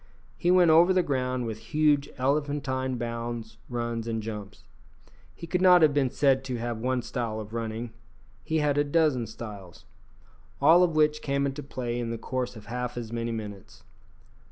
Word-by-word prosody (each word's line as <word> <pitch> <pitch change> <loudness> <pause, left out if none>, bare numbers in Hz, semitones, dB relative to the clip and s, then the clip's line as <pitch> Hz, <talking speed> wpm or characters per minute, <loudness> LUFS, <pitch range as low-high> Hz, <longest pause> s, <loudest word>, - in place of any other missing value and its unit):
He 175 - 0
went 180 -2 +6
over 170 +4 +6
the 185 -1 +3
ground 130 -3 -1
with 110 -1 -5
huge 145 +4 +1
elephantine 135 -2 -1
bounds, 115 -1 -5
runs, 120 -2 -3
and 115 -1 -1
jumps. 105 -2 -7 0.7
He 170 - -8
could 180 +2 -1
not 180 -2 +7
have 150 -2 +5
been 140 -3 +2
said 135 0 +2
to 130 -2 -3
have 120 -1 -3
one 125 +1 -1
style 115 -4 -3
of 110 0 -8
running; 115 0 -4 0.5
he 160 - -1
had 145 -2 +2
a - - +4
dozen 145 -5 +1
styles, 105 -5 -10 0.7
all 170 +2 +6
of 170 -3 +2
which 150 0 +3
came 140 -1 0
into 140 +1 -3
play 120 -4 -4
in 120 -1 -3
the 115 - -3
course 125 +2 -3
of 110 -1 -11
half 125 +2 -4
as 115 -1 -5
many 115 0 -2
minutes. 105 -4 -8
125 Hz, 180 wpm, -27 LUFS, 115-145 Hz, 0.7 s, not